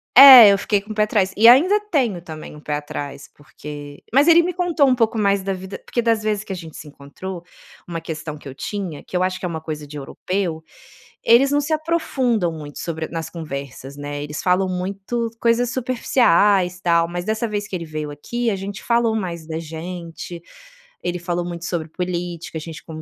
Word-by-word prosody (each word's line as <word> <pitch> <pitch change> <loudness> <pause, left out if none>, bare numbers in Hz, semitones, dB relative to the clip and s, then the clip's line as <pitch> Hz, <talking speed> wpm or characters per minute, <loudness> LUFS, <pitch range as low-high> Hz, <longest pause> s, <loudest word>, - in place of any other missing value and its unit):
É, 260 -5 +12
eu - - +2
fiquei 205 - +1
com 205 +2 -11
o - - -5
pé 210 - +3
atrás. 205 -3 +1
E 225 +3 +6
ainda 345 - +7
tenho 240 - +1
também, 155 -3 -9
um 150 - -11
pé 150 0 -3
atrás, 145 -1 -6
porque 145 0 -10
mas 280 +4 +5
ele 340 0 +7
me 360 +1 -2
contou 340 -6 +2
um 260 - +4
pouco 225 -2 +1
mais 200 -2 +2
da 195 +1 -2
vida 190 +1 -7
porque 240 - -1
das 225 -2 +2
vezes 210 -1 -1
que 195 - -6
a - - -4
gente 165 -4 -9
se 150 - -10
encontrou, 165 +6 -9 0.4
uma 170 -1 -4
questão 155 -2 -6
que 145 - -13
eu 135 - -7
tinha, 180 0 -5
que 180 - -4
eu 180 - +1
acho 185 0 -1
que 185 - -5
é - - 0
uma 160 -1 -5
coisa 150 -2 -6
de 150 +1 -9
europeu, 170 +3 -3 0.6
eles 250 +4 +5
não 290 - +3
se 315 +2 -2
aprofundam 265 - 0
muito 150 -2 -9
sobre 160 -1 -4
nas 165 -1 -4
conversas, 140 -4 -7
né, 145 0 -5
eles 150 +1 -6
falam 185 +1 +2
muito 195 +6 -3
coisas 235 +1 +2
superficiais, 205 -7 +2
tal. 170 -1 +3
Mas 175 +1 -5
dessa 220 +2 -1
vez 205 -1 -3
que - - -5
ele 170 -2 -4
veio 155 -1 -5
aqui, 235 +11 -2
a - - -1
gente 195 +1 -7
falou 235 -1 +2
mais 170 -6 -4
da 160 - -4
gente. 170 +1 -7 0.6
Ele 175 0 -2
falou 175 0 -2
muito 175 -1 -6
sobre 165 -3 -3
política, 175 -1 -4
a 155 - -5
gente 160 0 -9
con 160 -1 -8
180 Hz, 215 wpm, -21 LUFS, 160-220 Hz, 0.6 s, É